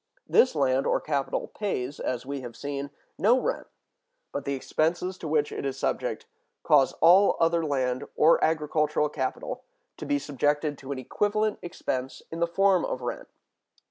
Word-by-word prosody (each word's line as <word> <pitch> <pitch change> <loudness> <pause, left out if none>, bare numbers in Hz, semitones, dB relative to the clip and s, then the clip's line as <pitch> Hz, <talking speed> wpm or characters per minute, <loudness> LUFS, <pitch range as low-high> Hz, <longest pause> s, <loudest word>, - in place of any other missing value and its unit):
This 255 - +4
land 135 -2 +2
or - - +2
capital 140 -3 -2
pays, 145 -10 -3
as 125 0 -3
we 140 0 -4
have 120 -2 -8
seen, 140 0 -4 0.3
no 225 +9 +4
rent, - - -2 0.6
but 140 - -4
the 140 - -1
expenses 170 +7 -1
to 160 - -5
which 150 -1 +1
it - - -5
is 135 -1 -3
subject - - -2 0.4
cause 140 -3 +4
all 185 +5 +6
other 165 0 +2
land 130 -4 -1
or 160 +2 +5
agricultural 150 -1 +1
capital 130 -3 -4 0.3
to - - -7
be 145 - +2
subjected 145 +1 0
to 135 0 -8
an 140 - -3
equivalent 210 - 0
expense 130 -7 -4
in 165 - -5
the 170 - +2
form 190 +1 +3
of 130 - -3
rent. 120 - -4
150 Hz, 165 wpm, -27 LUFS, 135-170 Hz, 0.6 s, all